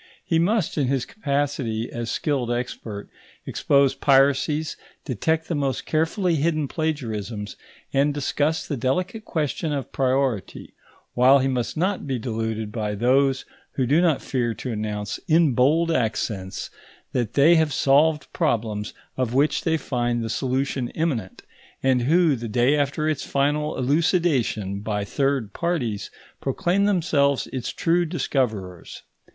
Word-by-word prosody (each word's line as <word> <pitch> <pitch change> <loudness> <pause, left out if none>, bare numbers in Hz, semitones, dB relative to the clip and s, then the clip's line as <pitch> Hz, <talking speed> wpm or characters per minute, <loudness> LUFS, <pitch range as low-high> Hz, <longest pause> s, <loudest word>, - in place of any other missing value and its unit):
He 165 - +2
must, 185 -2 +1
in 135 - +1
his 135 -1 0
capacity 140 - -2
as 120 -1 -4
skilled 130 -4 -1
expert, 120 -4 -4 0.4
expose 140 -1 +2
piracies, 140 +3 +2 0.3
detect 160 +6 -1
the - - -2
most 140 -3 -1
carefully 165 +2 +1
hidden 155 0 0
plagiarisms, 115 - -3 0.4
and 140 +2 +3
discuss 145 +2 -1
the 145 - -2
delicate 180 - -1
question 155 0 -2
of 140 -4 -3
priority; 130 -5 -1 0.4
while 130 +3 +6
he 135 0 +1
must 125 +2 -2
not 185 0 -1
be 135 -2 -1
deluded 110 -2 -3
by 105 -2 -2
those 130 +4 +2 0.3
who 130 - 0
do 145 +7 +3
not 165 -6 +2
fear 120 -4 -1
to 125 - -5
announce, 105 -1 -3
in 160 -3 +4
bold 155 +7 +3
accents, 105 -7 -2 0.4
that 120 -4 -2
they 145 +4 +6
have 160 -2 +2
solved 145 +3 +3
problems 105 -2 -1 0.2
of 125 -2 -1
which 145 +3 +2
they 160 -1 +2
find 120 -4 -1
the 115 - -3
solution 130 -1 -1
imminent, 135 - -2 0.4
and 130 -2 +3
who, 160 +3 +3
the 115 -1 -5
day 125 +5 +3
after 145 +1 0
its 155 -3 -1
final 150 +2 0
elucidation 135 - +1
by 105 -1 -2
third 135 -3 -1
parties, 150 - -2 0.3
proclaim 175 +8 +1
themselves 155 -8 +2
its 130 -2 -3
true 175 +1 +1
discoverers. 120 - -3
135 Hz, 140 wpm, -24 LUFS, 120-155 Hz, 0.4 s, while